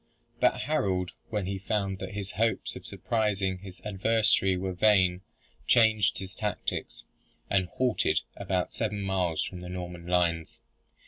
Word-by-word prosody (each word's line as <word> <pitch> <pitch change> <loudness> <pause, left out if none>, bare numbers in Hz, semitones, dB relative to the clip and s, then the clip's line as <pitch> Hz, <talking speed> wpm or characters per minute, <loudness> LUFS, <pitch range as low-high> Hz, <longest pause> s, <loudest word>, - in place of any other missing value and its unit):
But - - +3
Harold, 95 - 0 0.2
when 105 -3 -1
he 95 +1 -3
found 100 -1 -1
that 95 +1 -6
his 100 -1 -4
hopes 115 +2 0
of - - -9
surprising 100 -5 0
his 95 -1 -10
adversary 105 -2 +3
were 95 0 -2
vain 90 -2 +4 0.5
changed 110 -3 +4
his 95 0 -6
tactics, 105 -2 -3 0.5
and 95 -2 +3
halted 125 +5 +1
about 90 -1 -1
seven 105 -3 -2
miles 90 -4 0
from 90 - -6
the 90 - -7
Norman 90 -1 -6
lines. 85 -2 +1
95 Hz, 140 wpm, -29 LUFS, 90-105 Hz, 0.5 s, vain